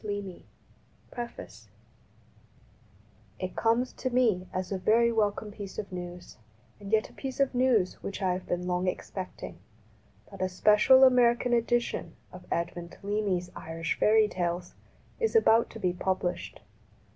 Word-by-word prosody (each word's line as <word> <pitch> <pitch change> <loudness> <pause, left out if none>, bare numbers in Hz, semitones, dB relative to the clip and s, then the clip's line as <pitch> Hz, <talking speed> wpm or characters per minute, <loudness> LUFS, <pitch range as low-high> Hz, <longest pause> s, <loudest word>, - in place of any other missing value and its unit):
169 205 -3 -5 0.7
PREFACE 240 -1 -8 1.7
IT 185 0 -5
comes 230 +3 +1
to 260 - -3
me 225 -8 +2
as 185 0 -4
a 195 - -1
very 230 +5 +3
welcome 210 -1 0
piece 200 -2 -8
of 210 -3 -5
news, 175 -3 -8 0.4
and 200 0 -9
yet 220 0 +2
a - - -20
piece 270 0 -6
of 275 -1 +2
news 245 -7 +2
which 195 - -5
I 185 -3 +1
have 180 0 -6
been 175 0 -2
long 180 +1 -1
expecting, 185 0 -5 0.7
that - - -9
a 185 - +1
special 210 +7 +5
American 245 -1 +4
edition 240 0 0 0.2
of - - -12
Edmund 170 0 -3
Leamy's 200 -3 -1
Irish 165 +1 -4
fairy 215 0 +5
tales 175 -2 -3 0.5
is 455 -1 0
about 230 - +5
to 225 - -10
be 180 -4 0
published. 185 0 -3
205 Hz, 145 wpm, -29 LUFS, 180-235 Hz, 1.7 s, special